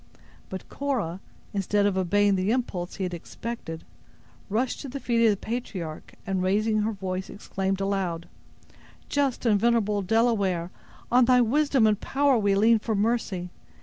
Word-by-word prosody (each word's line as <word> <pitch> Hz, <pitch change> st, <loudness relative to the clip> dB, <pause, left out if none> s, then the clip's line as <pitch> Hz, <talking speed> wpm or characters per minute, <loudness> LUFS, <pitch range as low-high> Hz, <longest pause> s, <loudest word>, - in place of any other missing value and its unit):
But 190 Hz, -, -7 dB
Cora, 235 Hz, -12 st, -2 dB, 0.3 s
instead 200 Hz, +1 st, +1 dB
of 200 Hz, -2 st, +2 dB
obeying 200 Hz, +2 st, +3 dB
the 190 Hz, +1 st, 0 dB
impulse 205 Hz, -7 st, -2 dB
he 195 Hz, -, -4 dB
had 180 Hz, -1 st, -2 dB
expected, 170 Hz, -1 st, -6 dB, 0.7 s
rushed 240 Hz, +5 st, 0 dB
to 275 Hz, -, -6 dB
the 275 Hz, +2 st, -5 dB
feet 235 Hz, -2 st, +1 dB
of -, -, +6 dB
the 205 Hz, -, +2 dB
patriarch, 190 Hz, -9 st, -5 dB
and, 190 Hz, -1 st, -1 dB
raising 215 Hz, +4 st, +2 dB
her 215 Hz, +2 st, 0 dB
voice, 190 Hz, -2 st, -4 dB
exclaimed 195 Hz, -1 st, -3 dB
aloud: 190 Hz, -4 st, -2 dB, 0.8 s
"Just 280 Hz, -3 st, 0 dB
and 210 Hz, -3 st, +4 dB
venerable 210 Hz, -3 st, +2 dB
Delaware, 195 Hz, -5 st, +1 dB, 0.4 s
on 250 Hz, 0 st, +6 dB
thy 250 Hz, 0 st, +5 dB
wisdom 270 Hz, +1 st, +3 dB
and 210 Hz, -1 st, +2 dB
power 280 Hz, 0 st, +2 dB
we 200 Hz, -2 st, +2 dB
lean 220 Hz, +3 st, +5 dB
for 220 Hz, 0 st, -2 dB
mercy! 200 Hz, -4 st, -1 dB
205 Hz, 155 wpm, -26 LUFS, 190-235 Hz, 0.8 s, of